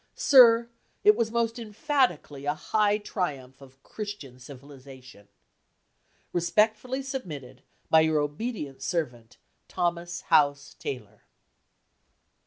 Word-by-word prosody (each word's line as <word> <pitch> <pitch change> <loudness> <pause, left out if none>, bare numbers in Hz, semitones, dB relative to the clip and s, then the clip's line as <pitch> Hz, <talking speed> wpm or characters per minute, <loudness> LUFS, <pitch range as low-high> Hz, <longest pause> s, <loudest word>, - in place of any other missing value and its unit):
Sir, 235 -4 +6 0.4
it 420 +1 +7
was 225 - 0
most 230 +1 -1
emphatically 225 - -1
a 145 +1 0
high 210 +4 +1
triumph 140 - -5
of 135 0 -17
"Christian 205 - -8
civilization"! 130 -4 -13 1.1
Respectfully 215 +9 +1
submitted, 155 - -7 0.3
by 160 - +7
your 160 -1 +2
obedient 145 - -4
servant, 125 -9 -4 0.3
THOMAS 175 0 -2
HOUSE 145 -4 +2
TAYLOR. 125 -7 -7
165 Hz, 95 wpm, -27 LUFS, 135-220 Hz, 1.1 s, it